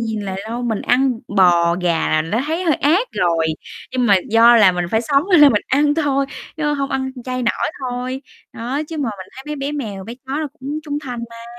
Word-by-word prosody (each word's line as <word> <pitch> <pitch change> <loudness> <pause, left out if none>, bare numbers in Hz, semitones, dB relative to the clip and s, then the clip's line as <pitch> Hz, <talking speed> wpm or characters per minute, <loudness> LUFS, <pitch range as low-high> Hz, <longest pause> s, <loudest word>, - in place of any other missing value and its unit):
nhìn 220 -2 -2
là 195 -2 -4
đâu, 235 +2 -4
mình 225 -4 -1
ăn 250 -1 +2 0.2
bò, 175 -2 +4
gà 170 -2 +1
là 155 - +2
đã 215 - -2
thấy 330 +4 -2
hơi 320 - +3
ác 360 - +2
rồi, 165 -2 +1 0.5
nhưng 250 -1 +1
mà 200 -3 +6
do 230 +2 +7
là 205 -5 +6
mình 175 0 -2
phải 220 - +2
sống 275 +3 +2
cho 350 - +7
nên 290 -3 +8
mình 210 - +1
ăn 290 +2 +2
thôi, 275 -3 +1 0.3
chứ 300 -1 0
hông 275 -1 -2
ăn 265 0 -2
chay 255 -1 -3
nổi 235 - 0
thôi. 255 +1 -4 0.3
Đó, 250 +5 -3
chứ 325 - -6
mà 260 -6 -1
mình 185 - -8
thấy 265 - -8
mấy 300 0 -4
bé 280 +1 -3
mèo, 210 -10 -5
bé 230 - -7
chó 265 - -4
nó 305 - -3
cũng 285 +3 -4
trung 290 -1 -3
thành 245 -2 -5
mà. 230 0 -11
250 Hz, 240 wpm, -19 LUFS, 215-285 Hz, 0.5 s, nên